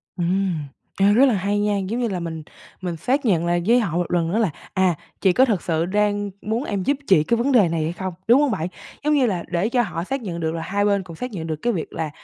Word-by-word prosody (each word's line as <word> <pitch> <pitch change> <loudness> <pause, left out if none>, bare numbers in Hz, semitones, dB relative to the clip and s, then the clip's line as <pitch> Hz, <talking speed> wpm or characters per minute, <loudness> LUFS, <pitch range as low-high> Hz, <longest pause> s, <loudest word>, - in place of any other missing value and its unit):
Ừm. 180 0 0 0.4
Ê, 200 +1 +5
rất 250 +6 +6
là 260 - +3
hay 200 +1 0
nha, 205 0 +1
giống 200 +5 -2
như 240 - +1
là 190 -4 -3
mình 165 -2 -5 0.4
mình 175 -3 -3
xác 260 - 0
nhận 175 -7 +2
lại 175 0 +1
với 240 +2 +5
họ 180 -8 -1
một 175 - -1
lần 170 -2 +1
nữa 210 - 0
là, 220 -5 +2 0.2
à, 190 -2 +2 0.3
chị 190 -2 +4
có 260 - +5
thật 210 -9 0
sự 165 -1 0
đang 205 +1 0
muốn 225 +4 -2
em 200 -9 -2
giúp 280 +8 +1
chị 165 -6 +5
cái 235 +9 +1
vấn 250 +5 +1
đề 215 -9 +5
này 165 -1 -1
hay 160 +2 -2
không, 185 0 -5
đúng 245 +5 +6
hông 290 -3 +2
bạn? 170 -5 -1 0.4
Giống 300 +1 +2
như 280 -3 +4
là, 185 -7 -1
để 175 +5 0
cho 245 0 +2
họ 170 -7 -3
xác 270 +8 -3
nhận 175 -6 -5
được 160 -1 -1
là 165 - -3
hai 200 +5 0
bên 200 -1 +2
cũng 170 -2 -10
xác 250 +9 -5
nhận 165 -6 -5
được 160 - -2
cái 240 - +1
việc 170 - -4
là 160 - -3
195 Hz, 285 wpm, -22 LUFS, 170-230 Hz, 0.4 s, rất